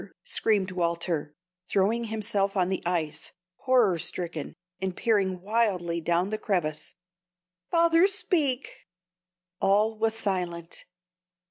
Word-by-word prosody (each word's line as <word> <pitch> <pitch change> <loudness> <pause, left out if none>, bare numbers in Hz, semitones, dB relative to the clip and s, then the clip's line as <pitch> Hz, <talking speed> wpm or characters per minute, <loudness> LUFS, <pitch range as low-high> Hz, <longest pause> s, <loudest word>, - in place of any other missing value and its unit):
screamed 200 -4 +1
Walter, 170 -4 -1 0.3
throwing 220 +5 +1
himself 205 -2 0
on 180 -1 +2
the 190 - -1
ice, 160 -3 -2 0.2
horror 240 -10 +3
stricken, 165 -2 -2 0.3
and 190 -1 -3
peering 195 -5 +1
wildly 190 -6 0
down 175 +4 +1
the 215 - -2
crevasse. 155 -7 -2 0.7
"Father, 335 +1 +5
speak!" 295 - 0 0.7
All 210 +3 +3
was 220 0 0
silent. 180 -6 -3
190 Hz, 105 wpm, -27 LUFS, 170-220 Hz, 0.7 s, Father